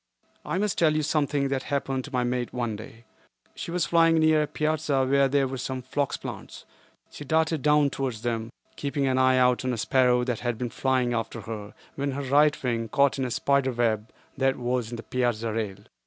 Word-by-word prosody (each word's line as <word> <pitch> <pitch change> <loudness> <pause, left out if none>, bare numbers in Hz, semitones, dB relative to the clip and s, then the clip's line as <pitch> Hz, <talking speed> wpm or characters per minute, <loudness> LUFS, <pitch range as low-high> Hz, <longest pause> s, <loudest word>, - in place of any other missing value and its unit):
I - - -2
must 205 0 0
tell 160 -2 +4
you 155 - +1
of - - -2
something 145 -2 0
that 135 -1 -1
happened 135 -2 -2
to 145 - -10
my 125 -2 0
mate 120 0 -2
one 120 -3 -2
day. 115 +2 -11 0.5
She - - -7
was 175 0 0
flying 165 -1 +4
near 155 -1 +4
a 150 - 0
piazza 155 -2 0
where 140 +1 +3
there 135 0 +2
were 130 0 -5
some 130 0 -4
phlox 140 +2 -2
plants. - - -8 0.5
She - - -9
darted 160 +1 +1
down 150 -1 +3
towards 125 -5 -3
them, 115 -1 -2 0.2
keeping 140 -1 -2
an 130 -1 +1
eye 130 0 +4
out 125 0 +3
on 130 -1 -1
a - - -3
sparrow 125 +1 +3
that 125 -3 -2
had 120 -2 -2
been 120 0 -3
flying 130 -2 +1
after 115 0 -3
her, 105 -1 -7 0.2
when 140 0 -2
her 140 +1 -3
right 145 +3 +3
wing 115 -2 -1
caught 140 +3 +2
in 130 - 0
a - - -2
spider 135 +1 +1
web 110 -2 0 0.3
that 135 0 +2
was 125 -2 -1
in 120 - -5
the 115 - -7
piazza 115 -3 -1
rail. 105 -4 -3
130 Hz, 215 wpm, -26 LUFS, 120-145 Hz, 0.5 s, tell